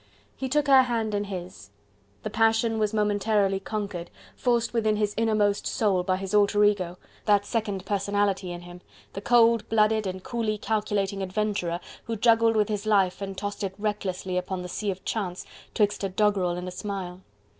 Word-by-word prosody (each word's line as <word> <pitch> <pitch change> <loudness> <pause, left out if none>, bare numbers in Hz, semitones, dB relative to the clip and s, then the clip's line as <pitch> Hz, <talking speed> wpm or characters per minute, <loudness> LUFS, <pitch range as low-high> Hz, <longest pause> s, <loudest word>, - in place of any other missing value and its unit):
He 265 - -4
took 295 +2 +2
her 270 -2 +7
hand 230 -4 -1
in 205 0 0
his. 180 - -8 0.5
The - - -4
passion 225 0 +2
was 210 -1 +1
momentarily 205 -2 +1
conquered, 200 -5 -4 0.3
forced 240 -2 +1
within 220 -2 +2
his 210 -1 0
innermost 215 -2 +1
soul, 205 -7 +1
by 185 +1 0
his 195 +1 -5
own 210 - +6
alter 205 +1 +3
ego, 185 -4 +1 0.3
that 205 -1 +3
second 205 -4 -2
personality 200 -1 0
in 175 0 -6
him, 175 0 -11 0.3
the 195 - -5
cold 230 0 +4
blooded 215 -1 +2
and 185 0 -5
coolly 225 -3 -2
calculating 205 -2 -1
adventurer 190 -3 -1 0.3
who 230 - -3
juggled 225 0 +4
with 210 -1 +3
his 210 0 -3
life 195 -3 +2
and 195 -1 -5
tossed 205 0 -4
it 190 -1 -3
recklessly 190 -3 -2
upon 180 0 -4
the - - -5
sea 210 +3 -3
of 190 0 -5
chance 190 -5 -3 0.3
'twixt 205 -1 +1
a 195 - 0
doggerel 190 -3 +1
and 180 +1 -5
a - - -4
smile. 185 -1 -5
205 Hz, 180 wpm, -26 LUFS, 190-220 Hz, 0.5 s, her